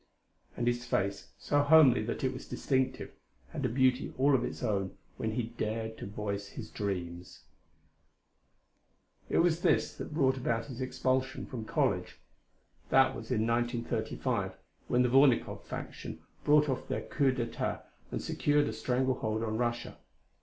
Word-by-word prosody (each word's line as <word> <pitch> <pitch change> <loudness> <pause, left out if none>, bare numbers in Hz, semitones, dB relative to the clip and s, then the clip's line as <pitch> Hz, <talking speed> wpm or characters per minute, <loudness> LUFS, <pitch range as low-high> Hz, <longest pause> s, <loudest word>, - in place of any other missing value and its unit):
And 120 - -1
his 120 0 +1
face, 100 -4 -1
so 145 0 +2
homely 145 -5 +7
that 115 - -3
it 130 0 +1
was 130 - -8
distinctive, 130 -2 -1 0.4
had - - -5
a - - +2
beauty 130 +2 +2
all 140 +2 +4
its - - -5
own 100 -2 -1 0.2
when 110 0 -2
he 120 - 0
dared 110 -1 -3
to - - -6
voice 100 -1 -4
his 110 +1 -8
dreams. 90 -4 -4 1.9
It - - +1
was 170 -1 +3
this - - +2
that - - -6
brought 135 -4 +2
about 115 -3 -1
his 130 -2 -7
expulsion 130 +1 -1
from 120 -6 -6
college. - - 0 0.7
That 135 0 +5
was 115 -1 -8
in 110 -4 +1
1935 120 0 -1 0.3
when 125 0 +3
the 125 - +2
Vornikoff 135 -1 +4
faction - - -7 0.2
brought 150 0 +5
off 130 -2 -2
their - - -2
coup 140 -2 +2
d'etat 125 -3 -3 0.3
and - - -4
secured 145 0 +2
a - - -4
strangle 130 0 0
hold 110 0 -1
on 110 0 -2
Russia. 120 0 -2
120 Hz, 155 wpm, -31 LUFS, 110-130 Hz, 1.9 s, homely